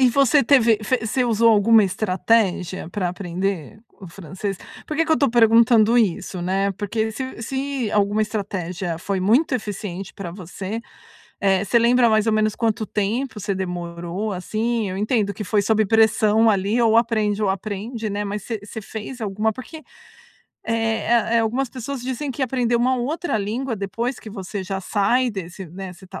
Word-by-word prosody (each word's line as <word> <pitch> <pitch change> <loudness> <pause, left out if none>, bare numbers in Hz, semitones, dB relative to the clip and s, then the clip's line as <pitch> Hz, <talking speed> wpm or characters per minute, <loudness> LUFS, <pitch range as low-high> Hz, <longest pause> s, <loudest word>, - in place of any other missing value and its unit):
E 255 - +6
você 275 +2 +4
teve 230 -4 +4
fe 255 +4 +1
você 250 +3 +1
usou 230 0 +4
alguma 220 0 +5
estratégia 190 -2 0
pra 185 -3 -1
aprender 185 +2 -4 0.2
o 190 - -10
francês? 190 +3 -6 0.3
Porque 310 +1 0
que 320 - +2
eu - - +4
tô 275 -4 +2
perguntando 230 0 +5
isso, 185 -4 0
né? 195 +2 0
Porque 220 +3 -2
se 260 -1 -6
se 265 -3 -2
alguma 205 +1 +2
estratégia 185 -5 -3
foi 190 +1 -2
muito 245 - +3
eficiente 200 -4 -5
pra 180 -4 -7
você, 190 +4 -6 0.6
eh, 195 -1 +2
você 235 +4 +3
lembra 235 0 +4
mais 215 0 +2
ou 220 - +3
menos 215 -1 +1
quanto 225 -1 0
tempo 215 +4 -2
você 200 0 -2
demorou, 175 +2 -4
assim? 220 +3 -2
Eu 185 - -4
entendo 210 -1 0
que 210 - -6
foi 205 +1 +1
sob 220 +1 +2
pressão 220 +1 +4
ali, 205 +3 +1
ou 225 -1 +4
aprende 215 -3 +1
ou 205 - +2
aprende, 215 +3 -4
né, 205 +1 -2
mas 205 0 -4
você 225 -3 -4
você 215 +1 -7
fez 220 +4 -7
alguma? 210 +2 0
Porque, 260 +7 -9 0.9
eh 225 0 -1
eh 235 -1 +2
eh, - - +5
algumas 245 +4 0
pessoas 255 +2 -6
dizem 260 +3 -3
que 265 +2 -4
aprender 245 -2 +1
uma 255 +2 +2
outra 300 +5 -2
língua 230 +5 -2
depois 230 +6 -3
que 220 - -10
você 200 -1 -5
já 190 +1 -4
sai 235 +6 +1
desse, 190 -2 -7
né, 185 +3 -8
você 185 +2 -15
tá - - -9
215 Hz, 180 wpm, -22 LUFS, 195-235 Hz, 0.9 s, E